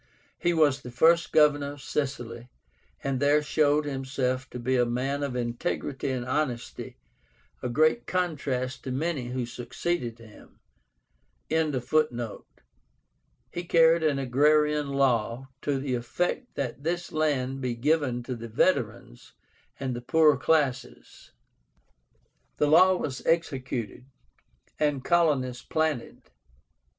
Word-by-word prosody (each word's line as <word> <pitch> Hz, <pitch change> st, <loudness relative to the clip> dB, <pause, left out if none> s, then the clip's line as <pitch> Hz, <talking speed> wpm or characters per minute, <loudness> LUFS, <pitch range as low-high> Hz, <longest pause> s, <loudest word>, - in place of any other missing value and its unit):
He 175 Hz, -, +2 dB
was 150 Hz, -5 st, +3 dB
the 125 Hz, -, -8 dB
first 165 Hz, +8 st, +3 dB
Governor 145 Hz, -2 st, +3 dB
of 145 Hz, -, -13 dB
Sicily, 125 Hz, -4 st, -4 dB, 0.5 s
and 135 Hz, -2 st, -1 dB
there 145 Hz, +2 st, +3 dB
showed 150 Hz, 0 st, +2 dB
himself 130 Hz, -2 st, -2 dB
to -, -, -7 dB
be 125 Hz, +2 st, 0 dB
a 125 Hz, -, +4 dB
man 130 Hz, +4 st, -1 dB
of 140 Hz, -3 st, -3 dB
integrity 120 Hz, +3 st, -3 dB
and 125 Hz, -2 st, -2 dB
honesty, 130 Hz, -3 st, -3 dB, 0.6 s
a 125 Hz, -, -2 dB
great 155 Hz, -, +2 dB
contrast 140 Hz, -8 st, -2 dB
to 130 Hz, -, -4 dB
many 140 Hz, -1 st, -2 dB
who 125 Hz, 0 st, -3 dB
succeeded 120 Hz, +1 st, -3 dB
him.) 115 Hz, -2 st, -16 dB, 0.9 s
carried 155 Hz, -2 st, +1 dB, 1.9 s
an 150 Hz, -3 st, +2 dB
agrarian 150 Hz, +3 st, +2 dB
law, 130 Hz, -2 st, 0 dB
to 145 Hz, -2 st, 0 dB
the 135 Hz, -1 st, -3 dB
effect 175 Hz, -, -2 dB
that 135 Hz, -1 st, -4 dB
this 175 Hz, +3 st, -3 dB
land 135 Hz, -4 st, 0 dB
be 125 Hz, -2 st, -2 dB
given 130 Hz, -2 st, 0 dB
to 125 Hz, +1 st, -4 dB
the 115 Hz, 0 st, -8 dB
veterans 85 Hz, -, -1 dB, 0.5 s
and 130 Hz, -2 st, -2 dB
the 120 Hz, -, -5 dB
poorer 155 Hz, +4 st, +4 dB
classes. 140 Hz, -6 st, -1 dB, 1.3 s
The -, -, +3 dB
law 180 Hz, +5 st, +6 dB
was 135 Hz, -7 st, -4 dB
executed, 135 Hz, -8 st, -1 dB, 0.7 s
and 145 Hz, -3 st, 0 dB
colonies 145 Hz, -8 st, +2 dB
planted. 155 Hz, -6 st, -2 dB
135 Hz, 120 wpm, -27 LUFS, 125-155 Hz, 1.9 s, law